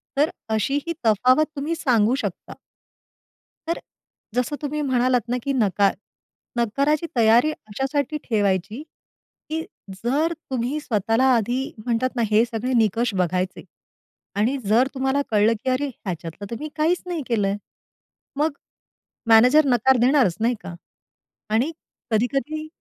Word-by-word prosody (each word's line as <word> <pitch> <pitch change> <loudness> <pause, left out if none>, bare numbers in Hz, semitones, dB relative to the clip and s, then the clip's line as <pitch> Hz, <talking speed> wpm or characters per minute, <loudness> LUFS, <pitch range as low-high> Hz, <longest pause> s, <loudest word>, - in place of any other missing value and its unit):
तर 295 +3 +2 0.2
अशी 245 +7 0
ही 335 - -1
तफावत 255 +7 +4
तुम्ही 295 +4 -2
सांगू 245 -6 +2
शकता. - - -5 1.1
तर 335 - -1 0.6
जसं 250 +4 0
तुम्ही 300 +1 -2
म्हणालात 255 -2 +2
ना, 250 - +1
की 280 - -1
नका 200 -5 +2 0.7
नकाराची 280 +7 +1
तयारी 235 +5 +5
अशासाठी 270 +5 -3
ठेवायची, 205 +1 0 0.7
की 320 +1 -2 0.4
जर 295 +8 +1 0.2
तुम्ही 260 +4 -1
स्वतःला 225 0 +1
आधी 240 +3 0 0.3
म्हणतात 250 +2 0
ना, 240 - 0
हे 215 +2 +5
सगळे 235 +2 -3
निकष 225 0 +2
बघायचे 185 0 -1 0.8
आणि 240 +7 +2
जर 225 +6 +4
तुम्हाला 265 +1 0
कळलं, 215 +1 +4
की 260 - 0
"अरे 260 +3 0
ह्याच्यातलं 180 - -7
तर - - -2
मी 305 +2 -5
काहीच 325 +3 +1
नाही 350 -3 -3
केलंय." 205 -4 +1 0.8
मग 305 +2 +2 0.8
मॅनेजर 250 +7 +6
नकार 260 0 +3
देणारच. 250 - +4
नाही 235 +2 +1
का? 175 - -8 0.7
आणि 235 +9 +1 0.4
कधी 220 +2 +3
कधी 310 +3 -2
250 Hz, 130 wpm, -23 LUFS, 220-285 Hz, 1.1 s, मॅनेजर